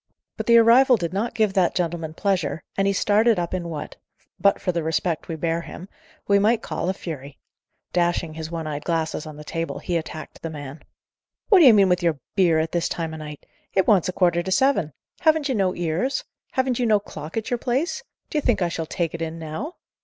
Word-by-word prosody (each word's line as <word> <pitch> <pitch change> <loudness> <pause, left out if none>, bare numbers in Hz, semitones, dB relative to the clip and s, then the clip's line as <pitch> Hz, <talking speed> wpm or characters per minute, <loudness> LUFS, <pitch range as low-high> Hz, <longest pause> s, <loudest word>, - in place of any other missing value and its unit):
But - - -5
the 235 0 +7
arrival 240 +2 +6
did 170 -3 -3
not 215 +5 -2
give 215 -3 +2
that 185 -3 +2
gentleman 165 -3 -2
pleasure, 195 -4 -1
and 195 0 +1
he - - +3
started 215 +3 +3
up 175 0 -2
in 175 -2 -3
what, 155 -3 -6 0.4
but 200 - +3
for 180 - -1
the 170 -1 -1
respect 160 +1 -1
we 165 - -4
bear 165 +1 -1
him, 175 +2 -9 0.4
we 200 0 +4
might 220 +3 +2
call 180 - -3
a - - +1
fury. 145 -6 -7 0.6
Dashing 175 -2 +1
his 160 0 -6
one 165 -1 -4
eyed 150 -1 -4
glasses 160 -2 -2
on 150 -1 -9
the 150 - -9
table, 165 +2 -4
he 175 -2 -2
attacked 155 -1 -7
the 165 - -4
man. 145 -1 -8 0.7
"What 400 -4 +7
d'ye 280 -8 +9
mean 200 -3 +5
with 180 0 +2
your 165 -3 +1 0.2
'beer' 175 -5 +4
at 160 0 0
this 170 -1 0
time 165 -2 -3
o' - - -6
night? 150 -1 -9 0.3
It 190 - +4
wants 190 -5 +4
a - - 0
quarter 175 -2 +2
to 190 - -5
seven! 265 - +2 0.3
Haven't 315 -3 +3
you - - +1
no 190 -5 +1
ears? 175 - -1 0.3
haven't 260 -2 0
you 245 - +1
no 215 -2 +4
clock 155 -3 -8
at 225 - -3
your 245 - 0
place? 265 +9 -1 0.3
D'ye 300 - 0
think 240 -8 +1
I 175 - +1
shall 165 -1 -4
take 170 -1 -2
it 165 - -6
in 165 0 -3
now?" 165 - -6
175 Hz, 225 wpm, -23 LUFS, 160-215 Hz, 0.7 s, d'ye